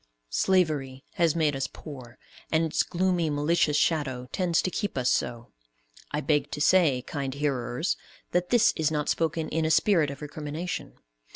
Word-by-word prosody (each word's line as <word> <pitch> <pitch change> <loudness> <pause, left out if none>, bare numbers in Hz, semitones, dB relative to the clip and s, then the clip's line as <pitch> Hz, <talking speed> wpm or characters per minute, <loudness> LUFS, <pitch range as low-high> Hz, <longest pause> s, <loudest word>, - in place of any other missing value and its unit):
Slavery 145 - +1 0.3
made 155 -4 +2
us 135 0 -1
poor, 130 -6 -10 0.3
and 160 +1 +3
its 160 - +1
gloomy, 180 -2 0
malicious 150 +1 +2
shadow 140 -6 0
tends 175 -3 +1
to 185 - -1
keep 205 -4 -3
us 125 -1 +2
so. 120 -1 -2 0.6
I 150 - -2
beg 145 0 +1
to - - -4
say, 150 -6 +4
kind 140 -2 -4
hearers, 140 +1 -1 0.3
that 180 0 0
this 235 -2 +4
is 160 -1 +1
not 150 -1 -1
spoken 165 0 0
in 160 +1 0
a 155 - +1
spirit 160 -2 +3
of 140 +1 -8
recrimination. 150 +4 -5
150 Hz, 160 wpm, -27 LUFS, 140-170 Hz, 0.6 s, say